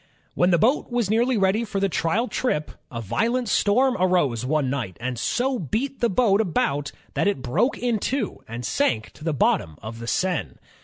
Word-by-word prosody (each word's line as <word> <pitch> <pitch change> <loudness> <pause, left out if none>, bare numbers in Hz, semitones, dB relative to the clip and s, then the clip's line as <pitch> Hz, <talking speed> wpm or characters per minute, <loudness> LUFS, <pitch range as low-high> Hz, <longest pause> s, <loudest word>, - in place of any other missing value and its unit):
When 175 - +3
the 175 - +4
boat 245 - +2
was 240 -5 0
nearly 240 +2 +2
ready 195 +3 +2
for 205 -3 -3
the 195 - +2
trial 195 +7 0
trip, 155 -15 -1 0.2
a 115 -2 -5
violent 230 - 0
storm 250 +7 +3
arose 175 -11 +2
one 145 +1 +1
night, 125 -10 -3
and 125 0 -3
so 255 - 0
beat 235 - -2
the 235 - +2
boat 205 0 +3
about 145 -7 0 0.2
that - - +1
it 200 -11 -1
broke 235 - +1
in 240 -3 0
two 255 -1 -2
and 115 +1 -6
sank 110 +3 0
to 150 - -14
the 165 - 0
bottom 80 - +1
of 115 +2 -7
the 115 - -7
Seine. 185 +3 0
185 Hz, 195 wpm, -24 LUFS, -, 0.2 s, the